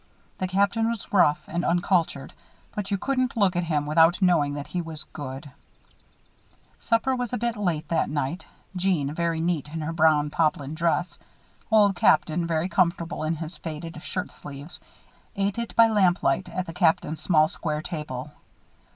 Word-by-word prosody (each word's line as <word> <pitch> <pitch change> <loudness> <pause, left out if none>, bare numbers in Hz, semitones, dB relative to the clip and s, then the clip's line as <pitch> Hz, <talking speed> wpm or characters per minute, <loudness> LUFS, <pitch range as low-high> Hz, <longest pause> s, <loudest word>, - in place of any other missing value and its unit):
The 185 - -1
Captain 200 +4 +1
was 230 -3 -5
rough 165 -6 +4
and 175 +1 -2
uncultured; 175 0 0 0.4
but 205 -2 -4
you 200 - 0
couldn't 255 +2 -1
look 195 -4 +3
at 175 0 0
him 150 -3 0
without 160 +3 +4
knowing 165 -7 +3
that 145 -1 -5
he 180 - -3
was 160 -2 -8
good. 140 0 -8 1.3
Supper 235 +3 +1
was 245 -2 -3
a - - +1
bit 235 +1 -1
late 175 -7 -1
that 165 - +1
night. 145 +4 -3 0.3
Jeanne, 175 -6 0
very 170 0 -1
neat 165 -3 -1
in 160 +2 -5
her 160 +2 -3
brown 155 -2 +3
poplin 150 -3 0
dress, 170 +1 -1 0.5
Old 210 -3 +5
Captain, 165 0 +3
very 165 +1 0
comfortable 170 -2 0
in 155 +1 0
his 160 +2 -6
faded 160 0 -7
shirt 185 +1 -4
sleeves, 145 +3 -9 0.6
ate 200 +2 -1
it 235 - -5
by 230 0 +7
lamplight 185 -5 +2
at 185 0 -3
the 165 - -8
Captain's 160 -2 +1
small, 155 -4 +4
square 155 -2 -3
table. 150 -5 -5
170 Hz, 165 wpm, -25 LUFS, 155-190 Hz, 1.3 s, by